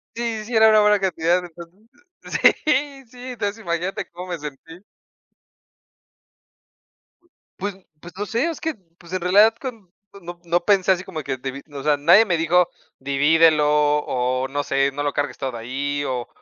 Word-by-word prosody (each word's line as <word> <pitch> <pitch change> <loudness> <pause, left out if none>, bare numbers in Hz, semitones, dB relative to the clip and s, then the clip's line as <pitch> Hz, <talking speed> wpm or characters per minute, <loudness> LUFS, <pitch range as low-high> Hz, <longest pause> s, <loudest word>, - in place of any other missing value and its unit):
Sí, 230 -2 -3
sí 235 0 -5
era 220 0 +6
una 215 -1 +5
buena 210 -1 +4
cantidad, 180 -1 0
entonces, 170 +2 -13 0.9
sí, 280 -1 0
sí, 250 +2 -10
entonces 210 -1 -4
imagínate 170 +2 -3
cómo 180 +1 -9
me 170 - -4
sentí. 150 +4 -10 2.8
Pues 200 0 -3 0.2
pues, 175 +2 -12
no 205 +1 -4
sé, 235 +7 0
es 320 - -10
que, 320 -2 -2 0.2
pues, 170 0 -15
en 185 - -2
realidad 205 +5 +5
cuan 230 -9 -8 0.3
no 175 0 -9
no 170 +1 0
pensé 195 -1 +3
así 185 0 0
como 170 -5 -6
que 130 - -3
divi 135 +2 -6
o 140 - -6
sea, 150 -1 +2
nadie 170 +9 +6
me 175 -5 0
dijo: 175 +2 +2 0.3
"Divídelo", 150 +3 +3
o, 145 -4 +1
no 145 +2 -2
sé, 135 0 +1
"No 145 - -4
lo 145 -1 0
cargues 145 0 -3
todo 130 -4 -4
ahí", 140 +5 -3
o 125 -2 -3
170 Hz, 170 wpm, -22 LUFS, 145-205 Hz, 2.8 s, era